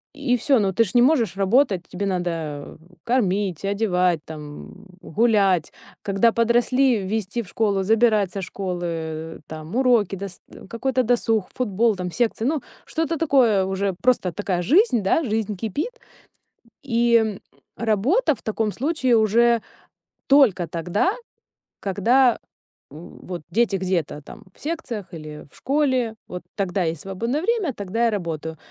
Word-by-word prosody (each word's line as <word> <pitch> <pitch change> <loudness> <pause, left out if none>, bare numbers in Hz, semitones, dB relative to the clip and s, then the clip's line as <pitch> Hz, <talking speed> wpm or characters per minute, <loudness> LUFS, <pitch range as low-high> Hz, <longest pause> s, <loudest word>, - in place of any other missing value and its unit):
и 275 -4 +1
всё. 270 0 +3
Но 195 -3 0
ты 230 - +4
же 200 - -5
не 245 - +5
можешь 240 - +3
работать, 200 0 +2
тебе 200 +3 -4
надо 165 -6 -3 0.3
кормить, 200 - 0
одевать, 185 -4 +1
там, 150 +3 -10 0.2
гулять. 200 -7 +2 0.3
Когда 200 +3 +3
подросли, 240 +2 +2
везти 210 +3 -2
в 200 - -11
школу, 200 -3 0
забирать 215 -2 +3
со 195 0 -5
школы, 165 -4 -4
там, 155 +5 -8
уроки, 240 -7 +3
дс 195 -1 -7 0.3
какой-то 260 +2 0
досуг, 225 -4 +1
футбол, 225 -2 +1
там, 180 -1 -4
секции, 230 0 -1
ну, 290 0 0 0.2
что-то 325 0 -2
такое 245 -11 +3
уже, 190 0 -1
просто 245 -8 +2
такая 180 0 -2
жизнь, 310 - +3
да, 205 +12 +2
жизнь 215 -3 -1
кипит. 295 - -4 0.8
И, 235 -3 +2
м, 220 -3 -1 0.3
работа 235 - +2
в - - -13
таком 220 0 -1
случае 260 -2 +1
уже 230 +2 +3 0.6
только 245 - +4
тогда, 175 - 0 0.7
когда, 235 +6 +3 0.5
м, 155 +4 -12
вот 175 -2 -5
дети 220 0 +2
где-то 180 -5 -2
там 210 +8 -13
в - - -26
секциях 270 - -4
или 155 -2 -9
в - - -22
школе, 260 -5 +1
вот 180 -1 -7
тогда 195 -2 -1
есть 160 -2 -2
свободное 230 +10 -2
время, 400 - 0
тогда 205 +4 -1
я 230 - +2
работаю. 160 -5 -4
210 Hz, 140 wpm, -23 LUFS, 185-245 Hz, 0.8 s, не